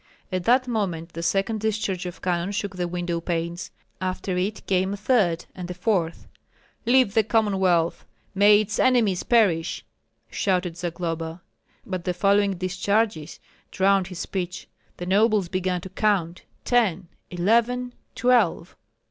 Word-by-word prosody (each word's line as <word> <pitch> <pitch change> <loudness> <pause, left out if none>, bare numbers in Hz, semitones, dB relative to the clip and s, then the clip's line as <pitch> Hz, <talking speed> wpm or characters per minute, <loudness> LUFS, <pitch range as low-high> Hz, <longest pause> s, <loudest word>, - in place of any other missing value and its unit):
At 185 -1 -2
that 255 +2 +4
moment 180 -8 -2
the 165 - -5
second 195 +5 0
discharge 205 -4 -2
of 175 - -9
cannon 180 +1 0
shook 200 -1 -3
the 180 -1 -2
window 175 -1 -3
panes; 170 0 -3 0.3
after 185 0 -2
it 195 +4 -2
came 190 +1 +1
a - - -4
third, 200 -6 +1
and 180 -1 -7
a 180 - -5
fourth. 180 -3 -1 0.6
"Live 250 -4 +4
the 220 - +5
Commonwealth! 190 -6 +1 0.3
May 205 +1 +6
its 215 0 -4
enemies 230 -8 +3
perish!" 200 -9 +2 0.5
shouted 180 -3 0
Zagloba. 165 -1 -4 0.4
But 185 -3 -4
the 180 - -1
following 200 +1 +2
discharges 185 -2 -1 0.3
drowned 195 -1 +2
his 180 -2 -8
speech. 180 0 -4 0.3
The 175 - -5
nobles 205 0 +2
began 185 -1 -1
to 190 - -8
count: 185 -4 0 0.2
"Ten, 200 -8 +1 0.2
eleven, 235 +7 +1 0.2
twelve!" 235 -9 +2
190 Hz, 140 wpm, -24 LUFS, 175-210 Hz, 0.6 s, May